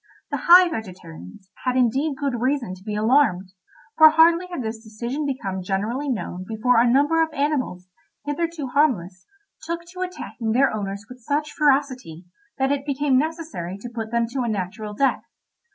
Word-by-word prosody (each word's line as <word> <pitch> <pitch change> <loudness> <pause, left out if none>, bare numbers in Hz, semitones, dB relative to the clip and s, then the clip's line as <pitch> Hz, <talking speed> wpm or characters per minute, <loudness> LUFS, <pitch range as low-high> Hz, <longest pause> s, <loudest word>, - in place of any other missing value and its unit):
The - - -3
High 360 +1 +9
Vegetarians 185 - -9
had 255 -1 0
indeed 265 +4 +1
good 265 -5 -2
reason 255 -6 0
to 185 0 -13
be 210 0 -4
alarmed, 215 -5 +2 0.5
for 315 0 +10
hardly 335 +3 +4
had 350 -8 -5
this 220 0 -5
decision 240 +7 -4
become 195 -9 -3
generally 215 +10 -2
known 185 -6 -4
before 230 +2 +2
a 240 +1 +4
number 290 +6 +3
of 320 -1 0
animals, 280 -11 -2 0.4
hitherto 315 +1 -2
harmless, 220 - 0 0.3
took 340 0 -5
to 365 - -7
attacking 250 -11 -4
their 270 +1 +3
owners 200 -1 -4
with 250 +2 -12
such 295 +4 -2
ferocity, 265 - 0 0.3
that 270 0 +1
it 280 -1 -1
became 280 -2 +1
necessary 305 - -4
to 240 +4 -8
put 225 -1 -4
them 235 0 +1
to 260 +2 -3
a 240 - -1
natural 210 +1 -4
death. 275 +4 +1
250 Hz, 170 wpm, -23 LUFS, 210-290 Hz, 0.5 s, for